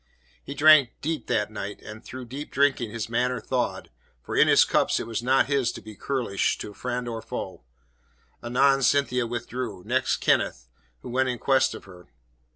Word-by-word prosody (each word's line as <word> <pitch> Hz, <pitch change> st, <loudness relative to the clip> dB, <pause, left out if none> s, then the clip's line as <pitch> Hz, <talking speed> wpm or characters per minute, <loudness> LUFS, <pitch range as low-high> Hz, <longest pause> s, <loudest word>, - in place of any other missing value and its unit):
He 140 Hz, -, -7 dB
drank 145 Hz, -3 st, +6 dB
deep 160 Hz, +1 st, -3 dB
that 105 Hz, 0 st, 0 dB
night, 105 Hz, -1 st, -6 dB
and 110 Hz, +1 st, -10 dB
through 130 Hz, 0 st, -8 dB
deep 135 Hz, +5 st, -7 dB
drinking 135 Hz, -4 st, +1 dB
his 115 Hz, 0 st, -4 dB
manner 125 Hz, +2 st, 0 dB
thawed 125 Hz, -2 st, -3 dB, 0.3 s
for -, -, -5 dB
in -, -, +5 dB
his -, -, +6 dB
cups -, -, +1 dB
it -, -, -4 dB
was 115 Hz, 0 st, -3 dB
not 130 Hz, +2 st, +3 dB
his 135 Hz, -4 st, +1 dB
to -, -, -8 dB
be 110 Hz, -1 st, -12 dB
churlish 120 Hz, -3 st, -1 dB
to 105 Hz, -, -7 dB
friend 125 Hz, +2 st, -4 dB
or 115 Hz, -1 st, -4 dB
foe. -, -, -7 dB, 0.8 s
Anon 135 Hz, +3 st, +3 dB
Cynthia 125 Hz, -2 st, +2 dB
withdrew; 120 Hz, -4 st, -5 dB
next 130 Hz, +4 st, +1 dB
Kenneth, 60 Hz, -1 st, 0 dB, 0.4 s
who -, -, -7 dB
went 130 Hz, +1 st, +1 dB
in 125 Hz, -, -2 dB
quest 135 Hz, +1 st, +2 dB
of -, -, -10 dB
her. 90 Hz, -3 st, -15 dB
125 Hz, 180 wpm, -25 LUFS, 115-135 Hz, 0.8 s, drank